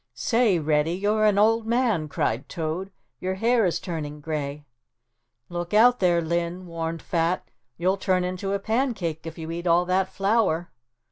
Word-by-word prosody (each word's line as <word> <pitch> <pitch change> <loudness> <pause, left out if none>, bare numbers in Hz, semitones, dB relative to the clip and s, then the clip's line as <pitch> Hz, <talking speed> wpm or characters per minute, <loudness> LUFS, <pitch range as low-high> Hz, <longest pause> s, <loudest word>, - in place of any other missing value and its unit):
"Say, 230 -6 +2
Reddy, 155 +1 +1
you're 210 +3 +1
an 210 -2 +3
old 225 +2 +3
man," 230 -9 +1
cried 120 -3 -2
Toad, 170 +3 -3 0.3
"your 185 +1 -2
hair 230 +1 +3
is 170 - -1
turning 150 -4 -5
gray." 150 -1 -4 0.8
"Look 175 +2 -4
out 245 +3 +6
there, 175 -2 +3
Linn," 170 +2 -2
warned 165 -1 -4
Fat, 170 +1 0 0.3
"you'll 185 +3 +1
turn 185 -1 +1
into 185 +2 -3
a - - +2
pancake 200 - -2
if 165 - -7
you 160 0 -6
eat 170 +1 -4
all 175 +1 +4
that 185 +1 +1
flour." 195 -5 +1
180 Hz, 160 wpm, -25 LUFS, 165-205 Hz, 0.8 s, out